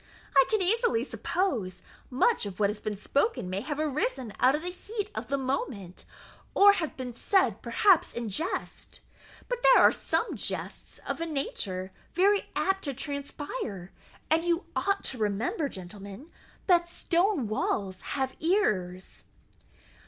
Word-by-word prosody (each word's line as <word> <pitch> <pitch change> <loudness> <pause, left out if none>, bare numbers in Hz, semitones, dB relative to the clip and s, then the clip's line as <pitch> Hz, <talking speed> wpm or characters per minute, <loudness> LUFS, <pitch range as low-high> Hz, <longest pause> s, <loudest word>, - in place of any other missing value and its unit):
I 270 -1 +7
can 430 -3 +2
easily 455 +4 +2
suppose 215 - -2 0.3
much 265 - +2
of 195 -1 -8
what 205 -1 +3
has 210 - -7
been 210 0 -3
spoken 275 - 0
may 190 +2 -2
have 295 +4 -4
arisen 295 - -1
out 260 +3 +5
of 305 - -4
the 355 - -3
heat 415 +3 -5
of - - -5
the 280 - 0
moment, 255 -9 -3 0.5
or 405 0 +8
have 335 -6 -3
been 255 -2 -5
said 240 - +2
perhaps 345 - +4
in 235 -1 -4
jest. 320 - -4 0.5
But - - -3
there - - +7
are - - +7
some - - -1
jests - - -4
of - - -3
a 335 - -1
nature 195 - -2 0.2
very 395 +3 +3
apt 385 0 +1
to 280 -2 -3
transpire; 280 - -5 0.4
and 325 +1 +4
you 345 +1 0
ought 395 0 0
to 255 - -4
remember, 235 - 0
gentlemen, 200 - -10 0.3
that 350 -2 +4
stone 345 - +1
walls 200 -2 -1
have 265 -1 -2
ears." 190 - 0
280 Hz, 150 wpm, -28 LUFS, -, 0.5 s, or